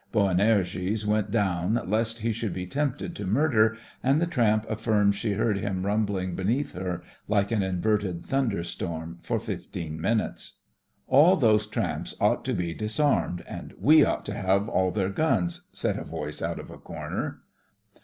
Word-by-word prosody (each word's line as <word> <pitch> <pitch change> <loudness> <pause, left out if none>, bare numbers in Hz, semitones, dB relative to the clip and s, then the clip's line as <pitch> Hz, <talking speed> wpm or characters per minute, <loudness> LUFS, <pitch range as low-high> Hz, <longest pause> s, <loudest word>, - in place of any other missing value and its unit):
Boanerges 100 0 +2
went 105 -1 +1
down 100 0 +1
lest 115 +3 0
he 115 +1 +1
should 110 -3 -3
be 90 - -3
tempted 140 +7 -2
to 100 - -5
murder, 110 -2 +3 0.2
and 135 +4 +3
the 170 - +2
tramp 115 -9 +2
afSrms 105 -2 +2
she 105 +1 -1
heard 105 0 +1
him 95 -2 -2
rumbling 100 -3 0
beneath 120 +11 0
her, 90 -1 -4 0.2
like 100 0 +1
an 110 -3 +2
inverted 95 -1 0
thunderstorm, 85 -9 -2
for - - -1
fifteen 80 -3 -5
minutes. 110 +5 -1 0.5
"All 150 +8 +6
those 110 - +3
tramps - - -3
ought - - +2
to 130 - 0
be 85 -3 -2
dis 110 - -4
armed, 140 - +2
and - - -8
we 155 +1 +7
ought - - 0
to 100 - -3
have 100 -1 +1
all 95 -4 +2
their 95 0 0
guns," 175 - 0
said 105 -2 -1
a - - -5
voice 75 -2 -5
out - - -2
of - - -9
a - - -11
corner. - - -5
105 Hz, 165 wpm, -27 LUFS, 95-115 Hz, 0.5 s, we